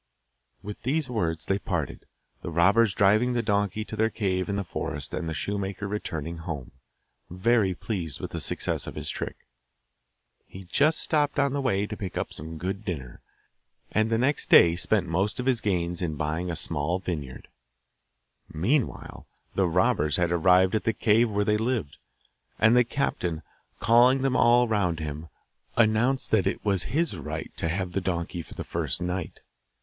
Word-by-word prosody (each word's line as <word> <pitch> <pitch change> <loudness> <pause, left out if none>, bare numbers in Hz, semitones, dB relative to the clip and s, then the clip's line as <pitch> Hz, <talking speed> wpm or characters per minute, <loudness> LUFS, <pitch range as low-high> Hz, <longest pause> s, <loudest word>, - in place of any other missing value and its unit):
With 105 +1 -7
these 140 +1 -1
words 85 -8 -1
they 95 +1 0
parted, 85 -8 -4 0.3
the - - -5
robbers 95 +6 +3
driving 105 +5 +3
the 120 -1 0
donkey 105 0 0
to 110 - -7
their 110 +1 +2
cave 95 -4 -1
in 100 - -1
the 100 - -1
forest 75 -6 -5
and 80 - -3
the - - -3
shoemaker 100 +4 -3
returning 85 -5 -4
home, 80 -6 -6 0.6
very 95 +1 +2
pleased 85 - -4
with - - -6
the - - -4
success - - -2
of - - -7
his - - -3
trick. - - -5 1.1
He 95 - -10
just 145 - +2
stopped 150 -2 +1
on 140 -1 +2
the 140 - -1
way 105 -7 +1
to 105 - -6
pick 95 -3 -6
up - - -2
a - - -7
good 90 +6 -5
dinner, 70 - -6 0.7
and 110 +1 +1
the 115 - +2
next 130 +4 0
day 85 -1 +7
spent 90 +1 +1
most 95 +8 -1
of 125 - -2
his 130 -4 +2
gains 90 -4 -1
in 80 -4 -2
buying 80 +5 -2
a 85 - -2
small 80 +2 +1
vineyard. 75 -9 -6 1.0
Meanwhile 115 - -1 0.3
the 95 -2 +2
robbers 80 -3 +2
had 85 -1 +1
arrived 90 +2 +4
at 110 - 0
the 115 - +2
cave 110 +2 +3
where 105 -1 0
they 105 0 +2
lived, 110 - -2 0.6
and 110 +2 +5
the 125 - +6
captain, 90 - -2 0.4
calling 125 +4 +5
them 135 -2 +1
all 120 0 +5
round 95 -7 0
him, 75 +1 -5 0.5
announced 115 +4 +2
that 100 -4 +3
it - - -1
as 100 -4 +1
his 160 - -1
right 75 - -5
to 80 - -1
have 90 +1 -2
the 95 - -1
donkey 85 -1 -3
for - - -13
the - - -5
first - - -2
night. 90 0 -4
95 Hz, 175 wpm, -26 LUFS, 85-115 Hz, 1.1 s, day